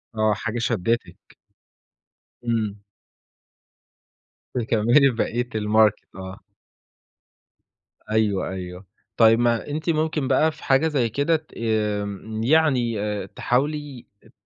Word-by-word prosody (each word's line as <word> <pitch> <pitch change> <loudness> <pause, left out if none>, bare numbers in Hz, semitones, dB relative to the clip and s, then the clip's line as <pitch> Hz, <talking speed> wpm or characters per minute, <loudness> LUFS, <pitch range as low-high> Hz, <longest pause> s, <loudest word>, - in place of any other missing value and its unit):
آه، 110 -1 +2
حاجة 115 +2 -4
شدتِك. 115 0 -1 1.3
إمم. 110 -3 -1 1.8
تكمّلي 120 +4 +3
بقيت 120 0 -2
الماركت، 105 0 +2
آه. 95 0 -8 1.7
أيوه، 105 -3 +1
أيوه. 90 0 -7 0.3
طيب، 115 0 +6
ما 120 +1 +1
أنتِ 155 +3 -3
ممكن 155 -3 0
بقى 155 +4 +3
في - - -16
حاجة 135 +4 +3
زي 130 -7 0
كده 145 +7 +1
ت 155 0 -6
آمم، 110 -1 -2
يعني 130 -6 +2
آآ، 105 -2 -3
تحاولي 140 +4 -2 0.2
ات - - -21
115 Hz, 105 wpm, -23 LUFS, 105-135 Hz, 1.8 s, طيب